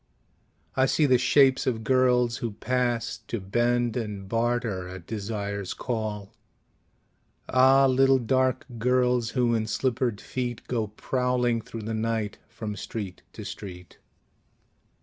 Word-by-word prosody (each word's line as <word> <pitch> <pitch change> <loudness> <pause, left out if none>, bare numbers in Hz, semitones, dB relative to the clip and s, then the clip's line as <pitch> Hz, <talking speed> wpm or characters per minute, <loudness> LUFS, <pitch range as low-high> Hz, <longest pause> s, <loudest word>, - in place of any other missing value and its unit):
I 130 0 +3
see 150 - +3
the 130 -3 +4
shapes 130 +1 +4
of 115 -3 0
girls 125 0 +3
who 115 -5 -4
pass 125 0 -1
To 115 - -3
bend 120 +4 +1
and 105 -5 -4
barter 115 -4 -1
at 90 -2 -9
desire's 100 -2 -4
call. 110 -4 -4 1.1
Ah, 135 +1 +5
little 135 0 +4
dark 130 +1 +1
girls 125 0 +2
who 120 -2 +3
in 110 -1 0
slippered 120 -2 0
feet 125 -1 -4
Go 115 -3 -1
prowling 125 +2 0
through 115 0 -8
the 110 +1 -3
night 110 -1 -2
from 110 -2 -5
street 100 -1 -6
to - - -8
street! 90 -3 -9
120 Hz, 130 wpm, -26 LUFS, 105-125 Hz, 1.1 s, Ah